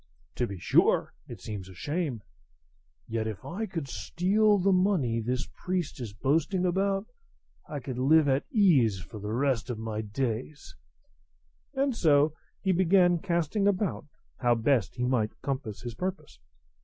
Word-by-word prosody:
To 120 - +1
be 100 - -6
sure, - - +3
it - - -9
seems 100 -3 -6
a 95 - -12
shame; 145 - -3 0.8
yet 110 -1 -2
if 110 -3 -6
I 215 +6 -4
could 165 -8 -4
steal 205 - +2
the 195 +1 +2
money 180 - +2
this 125 +3 -2 0.2
priest 180 -7 -2
is 115 -4 -5
boasting 160 - 0
about, 195 +2 +1 0.6
I 145 -2 -4
could 125 0 -5
live 150 +3 +5
at 135 0 +1
ease 145 - +4
for 100 +4 -9
the 105 +1 -5
rest 130 0 0
of 120 - -3
my 110 -1 -3
days;" 120 - -4 1.0
and 270 -2 +1
so 150 -5 +4 0.3
he 190 - +2
began 180 -1 +4
casting 170 +3 0
about 195 -6 0 0.3
how 120 -1 +3
best 115 -2 +1
he 125 -1 -1
might 120 -4 0
compass 130 -6 -4
his 120 -1 -5
purpose. 155 - -5
140 Hz, 155 wpm, -28 LUFS, 115-180 Hz, 1.0 s, live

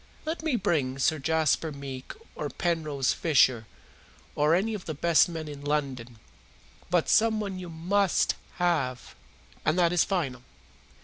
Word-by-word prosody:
Let 315 +1 -3
me 315 -5 0
bring 150 - 0
Sir 155 +3 +1
Jasper 160 +1 +1
Meek 135 -2 -7 0.2
or - - -4
Penrose 155 -6 0
Fisher, 130 -8 +3 0.7
or 150 +3 +3
any 215 +5 0
of 205 -3 -6
the 155 - -4
best 170 +3 +4
men 160 -2 -5
in 145 -1 -8
London. 135 -5 -2 0.7
But 175 -2 +2
someone 215 -4 +2
you 180 -1 -7
MUST 185 +4 +1 0.2
have, 150 -8 -1 0.5
and 155 - +1
that 175 -1 +3
is 175 - +4
final. 140 -10 -2
160 Hz, 140 wpm, -27 LUFS, 140-180 Hz, 0.7 s, best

